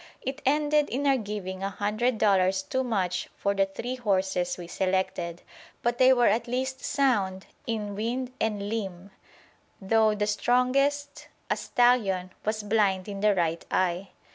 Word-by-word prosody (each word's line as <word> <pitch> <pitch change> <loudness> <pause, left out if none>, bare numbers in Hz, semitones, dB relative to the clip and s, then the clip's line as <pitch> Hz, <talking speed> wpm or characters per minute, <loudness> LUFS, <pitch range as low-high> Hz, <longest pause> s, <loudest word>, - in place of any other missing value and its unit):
It 275 +2 -4
ended 295 +1 +2
in 275 +4 -2
our 275 -1 +5
giving 200 -5 -5
a 195 - -1
hundred 215 +5 -1
dollars 190 -2 +3
too 260 +6 -1
much 185 -7 -1
for 200 - 0
the 195 -1 +2
three 245 +6 -5
horses 190 -5 0
we 175 - -7
selected; 185 -1 -2 0.4
but 240 0 0
they 260 0 +7
were 245 -2 +4
at 230 +3 +2
least 260 +2 -3
sound 205 -9 +1 0.2
in 215 -3 -2
"wind 245 +5 -3
and 205 -2 -1
limb," 195 -3 -4 0.7
though 215 +2 +3
the 210 0 0
strongest, 265 +6 +1 0.2
a - - +3
stallion, 205 -7 +2
was 215 0 -2
blind 205 -3 +1
in 200 -1 -5
the 210 0 +3
right 170 -2 0
eye. 185 +1 0
210 Hz, 155 wpm, -27 LUFS, 190-250 Hz, 0.7 s, they